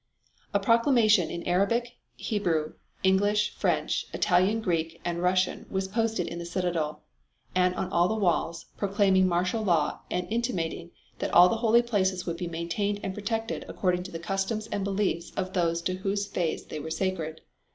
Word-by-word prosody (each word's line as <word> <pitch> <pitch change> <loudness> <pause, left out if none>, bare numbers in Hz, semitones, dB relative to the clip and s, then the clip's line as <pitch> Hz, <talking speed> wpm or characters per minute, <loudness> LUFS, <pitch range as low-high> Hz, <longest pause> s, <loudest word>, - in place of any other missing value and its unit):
A 200 - +2
proclamation 230 - +4
in 170 - -5
Arabic, 200 +7 +1 0.2
Hebrew, 170 -8 -1 0.3
English, 205 +2 +3
French, - - 0
Italian 190 +4 +3
Greek 165 -5 -1
and 170 0 -2
Russian 185 +1 +1
was 190 0 -2
posted 225 -2 0
in 170 - -5
the - - -5
citadel, 170 -4 -2 0.5
and 180 0 +2
on 185 - -3
all 175 0 +3
the 220 - -1
walls 170 -4 0
proclaiming 195 -2 +3
martial 180 +5 0
law 170 -7 +1
and 180 - -1
intimating 180 -8 -2 0.3
that - - -2
all 180 +1 +9
the 225 - 0
holy 230 +1 +4
places 190 -5 0
would 170 -1 -3
be 175 - -3
maintained 170 +5 -2
and 190 - -3
protected 225 +3 -3
according 180 -2 0
to 185 +1 -8
the 165 - -4
customs 195 +5 -2
and 200 - -1
beliefs 195 -4 -1
of 185 -1 -2
those 170 -2 +1
to 185 - 0
whose 200 +2 -1
faith 175 -5 -3
they 155 - -5
were 155 +2 -6
sacred. 160 -3 -2
185 Hz, 170 wpm, -27 LUFS, 170-205 Hz, 0.5 s, all